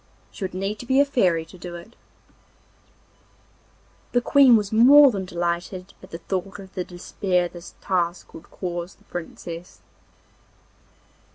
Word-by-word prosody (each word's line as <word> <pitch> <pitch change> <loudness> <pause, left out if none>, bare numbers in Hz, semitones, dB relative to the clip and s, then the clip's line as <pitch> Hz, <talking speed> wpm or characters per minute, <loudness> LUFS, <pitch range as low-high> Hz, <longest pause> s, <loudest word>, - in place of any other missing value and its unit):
She - - -8
would 185 -1 -4
need 195 +3 -3
to 245 - -9
be 265 +1 +3
a 285 - +6
fairy 185 - +1
to 180 +2 -15
do 175 0 -7
it.' 175 +7 -12 2.2
The 245 - +3
Queen 270 -1 +6
was 205 -2 -3
more 270 +5 +8
than 195 -4 -4
delighted 175 +2 -3
at 185 - -14
the 165 - -6
thought 185 +3 -4
of 195 -1 -12
the 185 - -3
despair 180 0 -1
this 175 0 -12
task 175 -2 -2
would 165 - -12
cause 175 -1 -5
the - - -27
Princess. 170 0 -8
185 Hz, 150 wpm, -23 LUFS, 175-210 Hz, 2.2 s, more